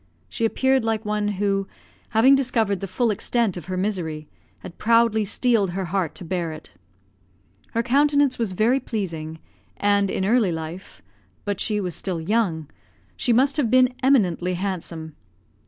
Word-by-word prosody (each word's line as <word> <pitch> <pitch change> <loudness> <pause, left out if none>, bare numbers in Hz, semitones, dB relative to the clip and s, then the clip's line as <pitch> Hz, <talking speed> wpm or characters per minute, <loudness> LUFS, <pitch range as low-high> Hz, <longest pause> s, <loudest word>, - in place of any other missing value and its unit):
She 225 - -2
appeared 265 +2 +2
like 225 -1 -1
one 210 0 -1
who, 195 -1 -1 0.4
having 235 +4 +5
discovered 230 -7 +1
the 195 - -5
full 220 +5 0
extent 220 0 0
of 175 -4 -7
her 185 +1 -4
misery, 170 -6 -3 0.3
had 170 - -11
proudly 230 -1 +3
steeled 210 -3 +1
her 190 - -2
heart 175 -3 -2
to 180 - -7
bear 170 -1 -2
it. 155 - -11 1.0
Her 230 - +2
countenance 285 +1 +3
was 220 -5 -1
very 230 +7 +2
pleasing, 165 -10 -4 0.4
and, 200 -1 +2
in 190 - -1
early 220 -3 +3
life 165 +3 -7 0.4
(but 205 -1 -2
she 210 -2 0
was 180 -3 -3
still 185 -4 -3
young), 165 -4 0 0.5
she 245 - 0
must 270 +5 +3
have 270 -7 +1
been 255 +1 +4
eminently 185 -9 +2
handsome. 170 -4 -5
205 Hz, 155 wpm, -23 LUFS, 180-235 Hz, 1.0 s, having